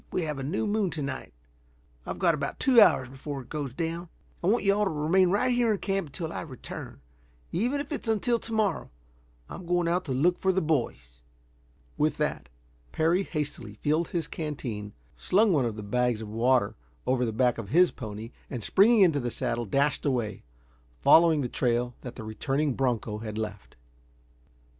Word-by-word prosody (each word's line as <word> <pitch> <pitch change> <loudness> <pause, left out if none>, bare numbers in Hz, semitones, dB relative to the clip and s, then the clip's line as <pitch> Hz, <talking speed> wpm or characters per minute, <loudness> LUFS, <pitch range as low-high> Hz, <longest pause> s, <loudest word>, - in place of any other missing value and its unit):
We 180 - -1
have 150 -3 -3
a - - -4
new 150 +10 -1
moon 210 -2 +1
to 155 -2 -4
night. 140 0 -5 0.8
I've - - -4
got 175 -3 +3
about 140 -2 -3
two 255 -5 +6
hours 130 -10 +5
before 135 +1 -6
it - - -21
goes 145 -4 -4
down. 165 +5 -4 0.3
I - - +1
want 225 +5 +3
you 200 -1 +4
all 210 +1 +1
to - - +1
remain 165 +5 +2
right 245 +7 +2
here 240 -2 +3
in - - -1
camp 195 -3 -2
until 160 +3 -5
I - - -4
return. 130 -7 -8 0.5
Even 245 +10 0
if 285 +1 -6
it's 290 - -4
until 225 +2 +1
to 230 - -7
morrow. 215 -7 0 0.6
I'm 175 - -9
going 175 -1 +1
out 180 +2 0
to 140 - -4
look 165 +8 +2
for 190 - +2
the 190 - +1
boys." 115 - -2 0.8
With - - +2
that 60 - -2 0.4
Parry 165 +4 +2
hastily 150 - -4
filled 155 +8 0
his 165 -3 -2
canteen, 120 -11 -5 0.2
slung 195 - +3
one 140 -6 +2
of 115 -2 -2
the 105 - -7
bags 125 +1 0
of 110 - -7
water 115 -1 +2 0.3
over 125 -1 +1
the 115 - 0
back 120 +1 +1
of 105 -4 -6
his 175 +7 +5
pony, 110 0 -7 0.2
and 120 -5 -5
springing 215 - +5
into 165 -6 +5
the 120 -2 -2
saddle 120 0 -2
dashed 140 +8 +1
away, 125 -7 -1 0.6
following 165 -2 +6
the 125 - -1
trail 120 0 0
that 125 - -8
the - - -7
returning 135 +7 -1
broncho 120 -5 -1
had 110 -1 -6
left. 105 -3 -6
150 Hz, 190 wpm, -28 LUFS, 120-180 Hz, 0.8 s, two